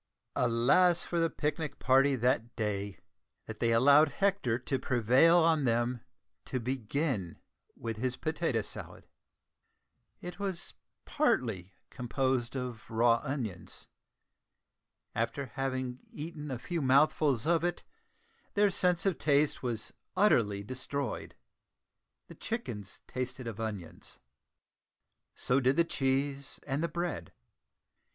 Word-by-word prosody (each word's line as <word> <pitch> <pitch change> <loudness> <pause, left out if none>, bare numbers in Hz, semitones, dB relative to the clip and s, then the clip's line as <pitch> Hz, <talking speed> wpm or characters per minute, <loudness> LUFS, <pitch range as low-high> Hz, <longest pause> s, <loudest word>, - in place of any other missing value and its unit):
Alas 125 +9 +3
for 170 - -2
the 165 0 +2
picnic 150 -1 -3
party 135 +2 +4
that 120 -1 0
day, 100 -3 -2 0.5
that 110 -1 -8
they 115 -1 +2
allowed 140 +6 +6
Hector 195 - +1
to 130 +2 -2
prevail 130 +8 +4
on 160 -3 +4
them 120 0 +1 0.4
to 130 - -2
begin 125 - -2 0.4
with 115 -2 -4
his 125 +2 -2
potato 155 -8 -1
salad! - - -8 1.1
It 180 +2 -8
was 195 -3 -3 0.3
partly 110 - 0 0.2
composed 130 0 -1
of 125 -4 -5
raw 115 +1 +3
onions. 120 - -5 1.2
After 115 +5 -1
having 130 0 -3
eaten 150 -1 -7
a 130 - -3
few 155 +8 -3
mouthfuls 140 -1 +3
of 165 0 +2
it, 175 -1 -1 0.7
their 205 -1 +4
sense 180 -1 +2
of 190 -4 +1
taste 145 0 +2
was 120 -4 -3 0.2
utterly 105 - +3
destroyed! 130 +2 -4 0.9
The - - -12
chickens 115 - -5
tasted 130 0 -5
of 115 -2 -6
onions, 105 -7 -6 1.2
so 125 +2 +2
did 130 +1 +3
the 170 - +5
cheese 135 -2 -1
and 145 +2 -1
the - - +2
bread. 170 +1 -4
130 Hz, 115 wpm, -31 LUFS, 115-155 Hz, 1.2 s, allowed